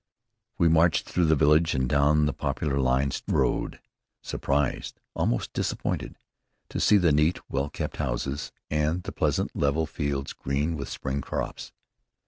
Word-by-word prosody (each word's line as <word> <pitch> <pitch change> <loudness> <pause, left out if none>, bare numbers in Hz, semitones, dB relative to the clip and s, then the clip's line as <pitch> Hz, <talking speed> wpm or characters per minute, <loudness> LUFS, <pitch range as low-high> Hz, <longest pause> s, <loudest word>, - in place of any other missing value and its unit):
We 85 - +4
marched 80 -1 +4
through 90 - +1
the 80 0 +4
village 75 +4 +4
and 65 -1 +1
down 75 +3 +3
the 75 - 0
poplar 70 -3 -1
lined 65 +1 +1
road, - - 0 0.4
surprised, 70 -1 -1
almost - - -1
disappointed, - - -2 0.5
to - - -3
see 105 - +5
the 90 -5 +3
neat, 75 +4 +3
well 70 +1 -1
kept - - -5
houses, 65 +3 -2 0.2
and 75 +4 0
the 100 - -5
pleasant, 75 -7 0
level 75 +3 +1
fields, 70 -3 -3
green 75 +5 -1
with 70 -2 -5
spring 70 +1 -3
crops. - - -4
75 Hz, 145 wpm, -27 LUFS, 70-80 Hz, 0.5 s, see